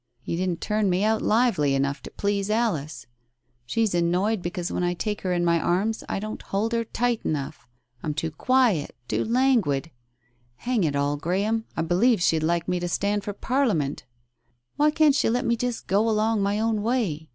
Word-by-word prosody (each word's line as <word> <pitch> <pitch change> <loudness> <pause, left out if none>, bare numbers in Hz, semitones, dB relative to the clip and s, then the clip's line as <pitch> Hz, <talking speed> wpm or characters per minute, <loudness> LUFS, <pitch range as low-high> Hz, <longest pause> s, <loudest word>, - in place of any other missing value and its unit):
You - - -3
didn't 180 -1 -2
turn 210 -2 0
me 180 +2 +1
out 220 0 +2
lively 200 - +2
enough 140 +1 -1
to - - -9
please 200 0 -1
Alice. 160 - -1 0.6
She's 225 - 0
annoyed 180 +5 +1
because 175 0 -4
when - - -1
I 175 0 0
take 210 +3 -3
her 185 - -2
in 175 -1 +1
my 170 -1 +3
arms, 195 +7 0
I - - -1
don't 215 +2 -6
hold 210 +4 -2
her 230 0 +1
tight 240 +1 -1
enough. 135 -4 -4 0.3
I'm 150 -2 -3
too 160 +1 -2
quiet, 230 - +1
too - - 0
languid!... 225 - +1 0.6
Hang 240 - -1
it 145 -2 -1
all, 145 +1 0
Graham, 200 +8 -1
I 160 - +1
believe 190 +8 +3
she'd 160 -2 +2
like 170 +1 0
me 180 -1 0
to 175 - -2
stand 205 +3 0
for 205 - -4
Parliament!... 205 - 0 0.7
Why 300 +1 +4
can't 305 -1 +4
she 285 - +2
let 245 +2 0
me 235 - +2
just 245 0 -3
go 210 +4 +2
along 215 0 +1
my 200 +1 0
own 220 -1 0
way? 205 -10 -1
200 Hz, 190 wpm, -25 LUFS, 170-225 Hz, 0.7 s, Why